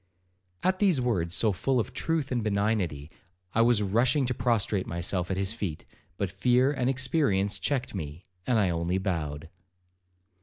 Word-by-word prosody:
At 185 0 +1
these 190 -9 +3
words, 95 -9 0
so 110 +1 +3
full 125 +8 0
of 110 - -3
truth 160 -4 -1
and 120 -3 0
benignity, 100 -8 -1 0.4
I 115 - +3
was 115 -2 +4
rushing 120 +8 +2
to 125 - -1
prostrate 115 -5 0
myself 85 +1 -2
at 95 - -1
his 95 +2 0
feet, 100 -9 -5 0.3
but 100 -2 -2
fear 125 +8 +3
and 130 -3 0
experience 130 -8 +1
checked 130 +6 -1
me, 80 -2 -6 0.2
and 125 - +3
I 95 -5 +2
only 85 +2 -1
bowed. 80 -5 -3
105 Hz, 160 wpm, -28 LUFS, 90-125 Hz, 0.4 s, was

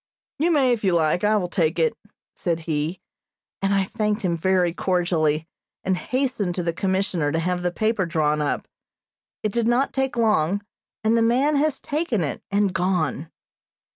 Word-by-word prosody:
"You 325 +4 +2
may 280 -6 +3
if 230 - -3
you 190 -3 +3
like. 165 +2 +2
I 210 +1 +4
will 180 -3 -1
take 170 -3 0
it," 470 - +2 0.4
said 170 -3 -1
he; 155 +2 -2 0.6
and 195 0 +1
I 195 -1 +3
thanked 210 +1 -2
him 175 -2 +1
very 180 0 +2
cordially, 165 -4 0 0.4
and 190 - +1
hastened 245 -4 -1
to 180 - -2
the 170 0 -1
Commissioner 185 -4 0
to 160 - 0
have 180 +2 -1
the 175 - +1
paper 215 -1 0
drawn 150 -2 +1
up. 145 - -1 0.8
It 215 - 0
did 235 -1 +1
not 245 +3 +2
take 265 -2 -1
long, 205 -4 +2 0.4
and 220 +1 +3
the 230 - +3
man 255 +6 +3
has 300 0 +1
taken 290 - -1
it, 145 - -3
and 200 -1 +1
gone. 170 -4 0
190 Hz, 175 wpm, -23 LUFS, 170-230 Hz, 0.8 s, I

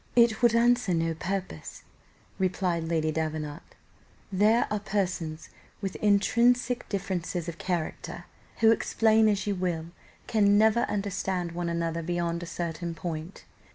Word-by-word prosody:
"It 235 -2 +4
would 235 -1 +5
answer 240 -5 +3
no 165 0 0
purpose," 185 - -5 0.6
replied 180 -3 0
Lady 160 -1 0
Davenant; 155 -2 -3 0.7
"there 210 +5 +4
are 210 - 0
persons 180 -6 -3 0.3
with 195 -2 -4
intrinsic 240 +4 +2
differences 180 -3 -3
of 170 -1 -6
character, 175 -4 -3 0.4
who, 225 0 +7
explain 220 -1 +3
as 200 -2 0
you 205 - 0
will, 175 -3 -2 0.3
can 205 -2 +3
never 220 +2 +4
understand 190 -3 -2
one 170 0 -3
another 170 0 -1
beyond 170 0 -2
a 175 - -6
certain 170 0 -4
point. 165 +1 -6
185 Hz, 130 wpm, -28 LUFS, 170-210 Hz, 0.7 s, who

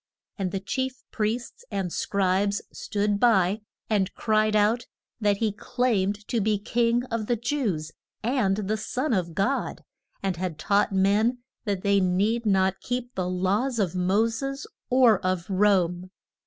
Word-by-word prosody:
And 190 -2 0
the 195 - -2
chief 260 +6 -3
priests 225 +2 -2
and 195 -4 -3
scribes 200 +1 +1
stood 205 -1 -1
by, 205 -3 +3 0.3
and 200 -3 +1
cried 215 -1 +2
out 215 +3 +2 0.3
that 205 -2 +2
he 220 0 +1
claimed 205 -3 -1
to 235 - +1
be 210 +1 +2
king 235 +3 +1
of 225 -2 -2
the 240 - +2
Jews, 215 - -2 0.3
and 220 -5 +1
the 215 +1 -1
son 255 +5 -2
of 170 -5 -1
God, 245 +8 -1 0.4
and 190 -3 -1
had 180 -3 -3
taught 205 +5 +2
men 210 +6 +2 0.2
that 200 -3 -2
they 200 0 +4
need 205 +5 +1
not 190 -1 +2
keep 245 0 -3
the 180 -1 -2
laws 200 +8 0
of 190 -6 0
Mo 190 +5 +2
ses 275 +5 -4 0.2
or 245 -6 +5
of 185 -2 -1
Rome. 185 -2 +2
205 Hz, 155 wpm, -26 LUFS, 190-230 Hz, 0.4 s, or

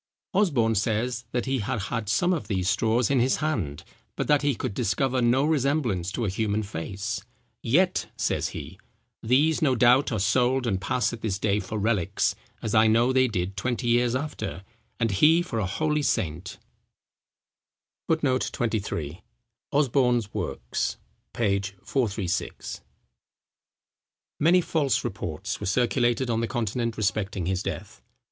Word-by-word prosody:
Osborne 140 - +3
says, 115 +3 -1
that 120 -2 -1
he 135 0 0
had 105 +1 -2
had 105 +1 -3
some 175 +11 +2
of 165 - -3
these 95 -4 -1
straws 110 +5 +2
in 135 - +3
his 130 +2 +3
hand; 105 - -2 0.3
but - - -2
that 145 -1 +4
he 145 -3 +1
could 105 - -3
discover 130 +6 0
no 125 +4 +3
resemblance 135 - 0
to 115 +3 -2
a - - 0
human 105 +2 -1
face; 100 +3 -4 0.4
"yet," 175 +10 +2
says - - 0
he, - - -8 0.4
"these 145 +7 +3
no 135 -5 +3
doubt 125 +4 +4
are 110 - -1
sold 125 +6 +2
and 95 -5 0
pass 120 +4 0
at 115 - -7
this 100 -4 -1
day 100 0 +1
for 110 - -5
relics, 105 -4 +1 0.3
as 110 - -2
I 110 0 +6
know 115 +4 +3
they 130 0 +4
did 95 -3 -2
twenty 120 +3 -1
years 120 +1 +3
after, 120 - -4 0.4
and 115 -2 +1
he 160 - +5
for 120 -10 -3
a 100 - 0
holy 150 +9 0
saint." 90 - -2 1.5
[Footnote 145 -6 +1
23: 100 -8 -3 0.5
OSBORNE'S 125 -6 +2
Works, - - -3 0.3
p. 100 -4 +1 0.2
436.] 105 -8 -2 1.6
Many 175 +4 +5
false 150 -6 0
reports 95 -8 -4
were - - -4
circulated 120 +2 +1
on 115 0 0
the 115 - 0
Continent 115 0 -2
respecting 100 -3 -1
his 95 +1 -1
death. - - -6
115 Hz, 150 wpm, -26 LUFS, 100-130 Hz, 1.6 s, I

